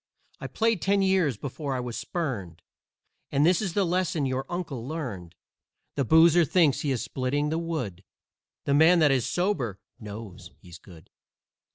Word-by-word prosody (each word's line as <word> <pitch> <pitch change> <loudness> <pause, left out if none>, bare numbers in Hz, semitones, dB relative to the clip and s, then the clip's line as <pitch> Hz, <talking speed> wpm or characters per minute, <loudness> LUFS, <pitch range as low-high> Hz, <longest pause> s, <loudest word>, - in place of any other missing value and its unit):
I - - -5
played 225 -4 0
ten 195 0 +2
years 185 - +2
before 140 +2 -4
I - - -2
was 125 -2 -5
spurned, 110 - -4 0.7
And 140 +2 +3
this 175 +3 +3
is 190 -5 -3
the 200 -2 +2
lesson 175 -4 0
your 130 0 -2
uncle 160 -9 -5
learned: 120 - -6 0.6
The 140 - 0
boozer 165 +5 +6
THINKS 155 -2 +2
he 145 - -2
is 130 -4 -1
splitting 145 +3 -1
the 160 +2 -1
wood, 125 - -4 0.6
The 140 - +1
man 160 +5 +6
that 155 -4 +4
is 130 -4 +1
sober 150 - -1 0.2
KNOWS 100 -4 -9
he's 90 -2 -13
good. 85 -3 -16
145 Hz, 165 wpm, -26 LUFS, 115-170 Hz, 0.7 s, boozer